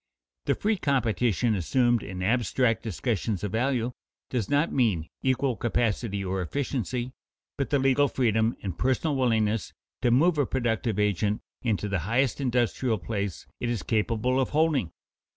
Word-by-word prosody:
_ - - -61
The - - +2
free 215 0 0
competition 120 - +1
assumed 120 +5 +2
in 90 -2 -5
abstract 115 +2 +1
discussions 110 -2 -2
of 105 - -2
value, 120 +1 0 0.4
does 120 -6 -1
not 145 +3 +2
mean 105 -12 +1
equal 130 -1 +1
capacity 110 -2 -1
or 95 0 -1
efficiency, 125 - -2 0.4
but 140 - -2
the 145 - +3
legal 135 +1 +3
freedom 115 -3 +1
and 95 -4 -3
personal 130 - 0
willingness 110 -5 +1 0.3
to 125 - +3
move 150 +7 +4
a 145 - +2
productive 115 -3 -1
agent 105 0 +1 0.2
into 105 -5 0
the 100 -2 -1
highest 120 - 0
industrial 120 -2 +1
place 100 -2 -4
it 120 - -2
is 120 -4 -2
capable 115 +3 +1
of 130 - +1
holding. 150 - +1
120 Hz, 150 wpm, -27 LUFS, 105-130 Hz, 0.4 s, move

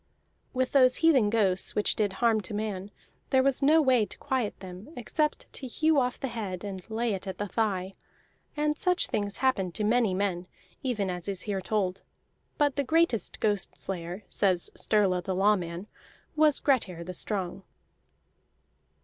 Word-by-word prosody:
With 255 0 -1
those 255 -2 +5
heathen 265 -10 +5
ghosts 200 -4 +2
which 210 - +1
did 205 -3 0
harm 225 +1 +2
to 210 +1 -4
man, 205 -2 -3 0.4
there 260 -1 +4
was 275 0 +2
no 310 +3 +5
way 255 -4 +4
to - - -7
quiet 260 -7 -2
them 185 +5 -10
except 300 +6 -1
to 265 - -4
hew 310 +4 +2
off 250 -1 -1
the 270 - -2
head 200 -6 -5
and 195 -2 -5
lay 225 0 -1
it 195 0 -5
at 190 -1 -5
the 205 - -3
thigh. 195 -3 -1 0.6
And 300 0 +1
such 360 +2 +2
things 205 -1 -2
happened 190 -9 +1
to 215 - -1
many 220 -3 +2
men, 185 -2 -1 0.3
even 210 -8 -1
as 180 0 -5
is 195 -2 -1
here 200 -3 -2
told; 195 -2 -1 0.6
but 290 -2 +1
the 280 - +2
greatest 320 -5 +1
ghost 205 -3 0
layer, 180 +1 -5
says 185 -4 +1
Sturla 195 -4 +1
the 190 0 -2
Lawman, 185 -2 +1 0.5
was 305 -2 +4
Grettir 200 - 0
the 185 +2 -6
Strong. 190 -1 -3
210 Hz, 165 wpm, -28 LUFS, 190-255 Hz, 0.6 s, those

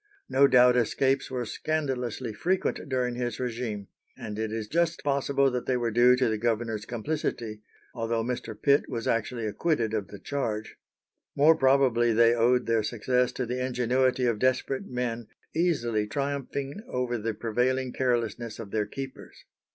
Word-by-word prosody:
No 135 +1 +5
doubt 125 -1 +6
escapes 130 +3 +1
were 125 -2 -3
scandalously 130 -5 -2
frequent 180 - -1
during 125 -2 0
his 120 -2 -3
régime, 115 -5 -3 0.3
and 110 -4 -6
it 110 -1 -2
is 110 -1 -3
just 170 +4 0
possible 140 -1 +2
that 125 -1 -3
they 130 - +2
were 120 -1 -1
due 120 +3 +6
to 125 0 +1
the 110 -1 -1
governor's 115 -1 -1
complicity, 120 -3 -3 0.3
although 115 -1 -1
Mr. 115 -3 -4
Pitt 140 0 +3
was 115 -1 -3
actually 115 0 -1
acquitted 115 0 0
of 105 -3 -1
the 100 - -10
charge. 110 -3 -3 0.6
More 155 +3 +6
probably 130 -4 +3
they 115 +1 +5
owed 120 +2 +3
their 115 -1 +2
success 125 +3 0
to 125 - -2
the 125 +2 -2
ingenuity 130 +1 +1
of 115 -3 +1
desperate 130 +2 0
men 120 -2 -3 0.3
easily 120 -11 +1
triumphing 140 - -3
over 125 -1 -2
the 110 0 -3
prevailing 125 +4 0
carelessness 120 -3 -1
of 105 -4 -8
their 105 -2 0
keepers. 135 +4 -9
125 Hz, 160 wpm, -27 LUFS, 115-130 Hz, 0.6 s, doubt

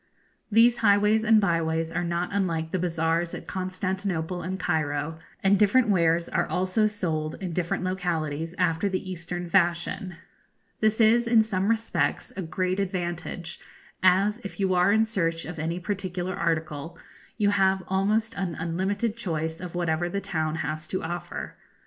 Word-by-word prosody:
These 235 +2 +5
highways 210 +1 +4
and 225 -1 +6
byways 165 -3 0
are 175 +1 -1
not 170 +1 -1
unlike 165 -5 -1
the 185 - 0
bazaars 165 0 0
at - - -8
Constantinople 185 -2 -3
and 185 +2 -4
Cairo, 155 -2 -1 0.2
and 195 +1 +4
different 220 +3 +4
wares 170 -3 +3
are - - 0
also 185 +4 +2
sold 160 -7 -2
in 185 -3 -5
different 170 +1 -1
localities 165 -3 -2
after 165 +5 +1
the 185 0 -3
Eastern 175 0 -5
fashion. 175 0 +1 0.6
This 215 +1 +2
is, 230 +2 +5
in 230 -2 +5
some 195 -3 -1
respects, 230 0 0
a 195 - -3
great 185 +3 -1
advantage, 175 -3 -3 0.4
as, 195 +4 +4
if 200 -4 -9
you 190 -1 +2
are 180 +2 +4
in 220 +1 +4
search 165 -7 -1
of 170 -2 -7
any 165 +3 -2
particular 185 -1 -3
article, 160 -1 -2 0.4
you 205 -2 +3
have 190 -1 +2
almost 210 +4 +1
an 185 -4 -3
unlimited 195 +7 -1
choice 160 -6 -3
of 180 -1 -7
whatever 175 0 0
the 200 - -2
town 160 -4 -2
has 155 +1 -4
to 185 - -3
offer. 175 +2 -5
180 Hz, 155 wpm, -26 LUFS, 165-200 Hz, 0.6 s, and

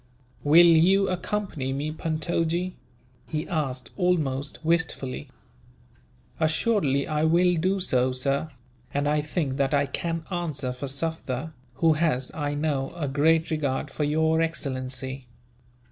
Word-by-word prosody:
"Will 160 +4 +7
you 180 +4 +5
accompany 185 -6 -2
me, 145 +3 -2
Puntojee?" 165 +3 -1 0.5
he 155 +1 -3
asked 135 -7 -2
almost 150 -7 0
wistfully. 160 - 0 1.1
"Assuredly 155 - +2
I 155 0 0
will 175 +3 +4
do 185 +4 +1
so, 130 -8 +1
sir; 140 +4 -1 0.5
and 145 0 +1
I 150 0 +2
think 150 -3 -2
that 140 0 +2
I 140 0 +3
can 165 +3 -3
answer 155 -8 -2
for 125 +3 -5
Sufder, 150 0 -3 0.2
who 160 +4 +4
has, 150 -5 0
I 145 -1 -2
know, 145 -3 -1
a 160 -4 -2
great 160 +4 +2
regard 145 -2 -1
for 150 - -2
your 160 +2 +2
excellency. 130 -4 -4
155 Hz, 130 wpm, -26 LUFS, 135-165 Hz, 1.1 s, Will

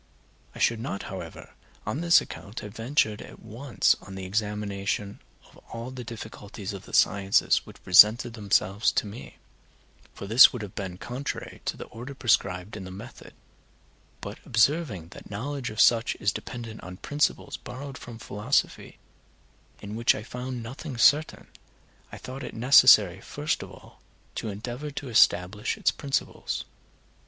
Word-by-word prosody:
I - - -9
should 115 -1 +2
not, 100 -3 -4
however, 85 -4 -9 0.3
on 120 +9 -2
this 170 0 +6
account 100 +5 -8
have 105 -1 -9
ventured 115 -2 0
at - - -12
once 120 +4 +1
on 95 - -10
the 95 -1 -6
examination 100 0 -2 0.3
of - - -20
all 115 +2 -6
the 130 -1 -7
difficulties 110 -3 -8
of 95 -1 -9
the - - -13
sciences 100 0 +3
which - - -14
presented 110 +6 +7
themselves 100 -1 +1
to - - +1
me, 105 +4 -10 0.8
for - - -7
this 115 +6 +8
would 120 -4 -6
have 100 - -8
been 90 -3 -5
contrary 125 +6 -6
to - - -2
the - - -6
order 125 +5 -9
prescribed 100 -6 +1
in 105 - -7
the 95 - -8
method, 105 +7 -11 0.9
but - - -7
observing 110 - +1
that - - -12
the - - -14
knowledge 130 +6 -4
of 110 - -8
such 115 -1 +4
is 100 0 0
dependent 115 -3 -7
on 90 0 -9
principles 150 +6 -1
borrowed 135 +2 -8
from 120 -2 -10
philosophy, 110 +4 -1 0.9
in 105 +1 -6
which 115 +1 +3
I 110 - -6
found 125 +1 -6
nothing 130 +3 -7
certain, 145 +6 +3 0.7
I - - -8
thought 130 +2 -8
it - - -7
necessary 110 -6 +6
first 150 +2 -2
of - - -8
all - - -16 0.3
to 110 - -4
endeavor 120 +8 -5
to 140 -1 -6
establish 105 -1 +3
its - - +2
principles. 140 -2 -3
110 Hz, 160 wpm, -27 LUFS, 100-125 Hz, 0.9 s, this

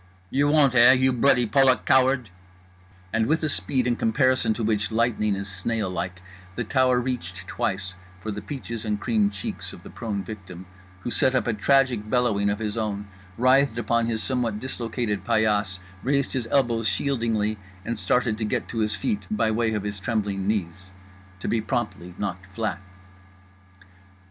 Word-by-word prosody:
"You 140 +2 +3
won't 145 -3 +4
eh? 125 +1 +8
You 130 0 +3
bloody 125 0 +4
Polak 130 +3 +3
coward!" 130 -4 +3 0.8
and 115 0 +2
with 160 +3 +1
a 155 - +1
speed 130 -3 -1
in 120 -1 +2
comparison 130 +1 +2
to 115 - -3
which 105 -1 +1
lightning 110 -2 +1
is 100 0 -4
snail 95 +1 -2
like 90 +1 -4 0.3
the 120 - -1
tower 130 +1 +3
reached 125 0 -4
twice 95 -1 -2 0.3
for 110 +4 -4
the 105 0 -5
peaches 115 -1 -6
and 105 -2 -1
cream 110 -3 +2
cheeks 100 -2 -6
of - - -12
the - - -11
prone 105 -4 -4
victim; 95 -3 -9 0.4
who 120 - -4
set 130 +2 +2
up 130 - +2
a 120 - +1
tragic 120 -1 +2
bellowing 110 -5 +2
of 100 - 0
his 105 0 -3
own, 105 -2 -3 0.3
writhed 130 0 +4
upon 115 0 +1
his 110 -1 -2
somewhat 120 -5 -1
dislocated 115 -4 -3
paillasse, 105 -4 +2 0.2
raised 140 +4 0
his 125 -4 -2
elbows 120 -5 +2
shieldingly, 115 -6 0 0.3
and 115 - -3
started 115 -3 +1
to - - -1
get 105 - -1
to 115 - -3
his 110 0 +1
feet 210 - -2
by 210 - +1
way 110 0 +1
of 105 - -2
his 105 -1 -4
trembling 100 -2 -1
knees—to 95 -1 -5
be 115 - +1
promptly 105 -7 -3
knocked 95 -2 -4
flat. 100 -1 -3
110 Hz, 170 wpm, -25 LUFS, 100-125 Hz, 0.8 s, eh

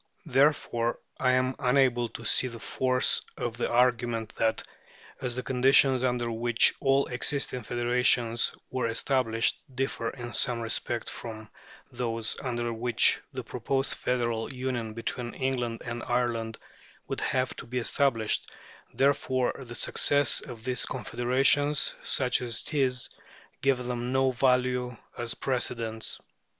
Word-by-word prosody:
Therefore 135 -5 +2 0.2
I 130 -1 +3
am 130 0 +1
unable 125 -2 +2
to 115 - -9
see 130 - +3
the 120 -2 -7
force 130 +2 +1 0.2
of 120 -1 -3
the - - -1
argument 120 -2 +1
that, 110 0 +1 0.6
as 125 -2 -2
the 125 - -3
conditions 130 0 +4
under 120 -2 0
which 115 +1 +3
all 135 0 +3
existing 125 0 -2
federations 120 0 +1 0.2
were 130 -2 -1
established 115 -1 0
differ 130 -3 -2
in 120 -2 -8
some 120 +1 +2
respects 115 +1 -1
from 110 -2 -8 0.4
those 115 -2 -2
under 120 -3 -2
which 120 +2 +3
the - - -5
proposed 135 0 -1
federal 120 -2 -1
union 125 -4 -3
between 120 +1 -3
England 125 -3 -2
and 120 -1 -4
Ireland 115 -2 -1 0.5
would - - -4
have 130 -1 0
to - - -8
be 125 +2 -4
established, 115 -2 0 0.5
therefore 130 -2 +1
the 120 -3 -9
success 145 +3 +4
of 120 -5 -10
these 125 +1 -1
confederations, 130 +4 +2
such 125 -2 +2
as 120 -2 -2
it - - -6
is, 130 -4 +2 0.5
gives 130 -2 +1
them 120 0 -3
no 130 0 +2
value 125 -1 +1 0.2
as 115 -1 0
precedents. 115 -4 -1
125 Hz, 135 wpm, -28 LUFS, 115-130 Hz, 0.6 s, conditions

